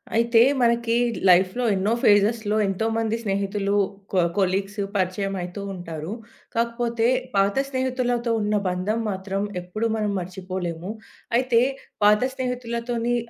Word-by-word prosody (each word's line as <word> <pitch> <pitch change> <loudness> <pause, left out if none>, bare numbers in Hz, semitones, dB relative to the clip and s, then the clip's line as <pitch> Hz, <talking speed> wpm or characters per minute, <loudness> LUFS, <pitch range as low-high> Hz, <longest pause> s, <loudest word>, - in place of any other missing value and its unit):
అయితే 230 0 +4 0.2
మనకి 235 -1 +2 0.3
లైఫ్‌లో 185 +6 +4
ఎన్నో 200 +4 +1
ఫేజెస్‌లో 210 +1 +3
ఎంతోమంది 225 +3 0
స్నేహితులు 200 0 -1 0.4
కొ 190 - +2 0.2
కొలీగ్స్ 195 +2 0 0.2
పరిచయంమ 195 +1 -1
అయతూ 180 +3 -6
ఉంటారు. 165 -2 -6 0.4
కాకపోతే 235 0 0 0.3
పాత 195 0 +3
స్నేహితులతో 255 -2 -1
ఉన్న 210 0 0
బంధం 185 +5 -1
మాత్రం 195 0 -3 0.2
ఎప్పుడూ 215 +6 -2
మనం 210 -2 0
మర్చిపోలేము. 180 -1 -5 0.5
అయితే 250 -2 +3 0.5
పాత 210 0 +6
స్నేహితులతోని 240 -2 -2
210 Hz, 110 wpm, -24 LUFS, 190-235 Hz, 0.5 s, పాత